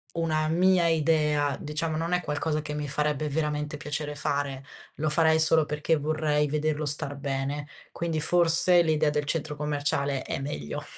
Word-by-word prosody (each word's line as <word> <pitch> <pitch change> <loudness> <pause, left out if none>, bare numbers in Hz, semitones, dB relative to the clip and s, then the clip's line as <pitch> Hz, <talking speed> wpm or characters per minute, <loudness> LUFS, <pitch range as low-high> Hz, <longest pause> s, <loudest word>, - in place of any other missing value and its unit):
una 155 -2 0
mia 180 +1 +3
idea, 150 -2 +1
diciamo, 155 +1 -2
non 165 +2 -3
è 180 - +2
qualcosa 155 0 -2
che 150 0 -6
mi 150 -1 -4
farebbe 150 +1 -1
veramente 150 0 -2
piacere 150 0 -3
fare. 140 -1 -2 0.3
Lo 155 +1 -1
farei 160 0 +3
solo 160 0 +5
perché 150 +2 0
vorrei 150 0 0
vederlo 150 0 -1
star 145 0 +1
bene, 140 +1 -4 0.3
quindi 165 -2 -2
forse 175 +2 +5
l'idea 155 -2 +1
del 150 0 -1
centro 150 0 -2
commerciale 145 -2 -1
è - - -4
meglio. 75 - -5
150 Hz, 160 wpm, -26 LUFS, 145-160 Hz, 0.3 s, solo